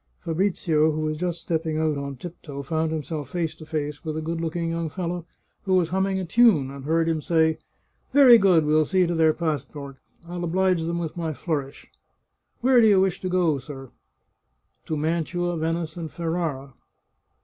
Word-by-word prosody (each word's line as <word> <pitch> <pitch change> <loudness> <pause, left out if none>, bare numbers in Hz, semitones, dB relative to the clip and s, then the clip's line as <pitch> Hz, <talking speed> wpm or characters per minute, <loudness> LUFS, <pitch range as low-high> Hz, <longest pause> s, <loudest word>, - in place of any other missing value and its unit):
Fabrizio, 165 -3 +1
who 155 +1 -3
was 155 0 -1
just 175 0 -2
stepping 160 -1 -2
out 155 -1 +1
on 140 -1 -5
tiptoe, 145 -1 -8
found 160 +3 -1
himself 155 -2 -4
face 165 0 -2
to 155 - -13
face 150 -2 -4
with 155 -1 -4
a - - -2
good 165 +1 -3
looking 165 0 -2
young 165 -1 -2
fellow, 175 0 -4 0.4
who 190 -1 +2
was 175 -3 +2
humming 190 +2 0
a 185 - -3
tune, 175 - +4
and 140 -1 -9
heard 165 +2 +1
him 160 -2 0
say, 160 0 +2 0.3
" - - -43
Very 255 -4 +8
good. 180 -6 +4
We'll 155 +1 +4
see 185 -2 +3
to 175 - -1
their 160 -1 +4
passport. 145 -3 -4 0.3
I'll 175 0 -5
oblige 180 0 +1
them 170 +1 -2
with 165 -2 -4
my 165 -2 -3
flourish." 145 -4 -4 0.4
" - - -49
Where 250 0 +5
do 220 - +6
you 200 -3 +5
wish 190 -1 +1
to 185 - -2
go, 175 -6 +2
sir? 135 -1 -10 0.3
" - - -49
" - - -47
To 155 - -2
Mantua, 170 +3 -1
Venice, 165 +1 -2
and 165 -2 -5
Ferrara." 160 -6 -3
165 Hz, 195 wpm, -24 LUFS, 155-175 Hz, 0.4 s, Very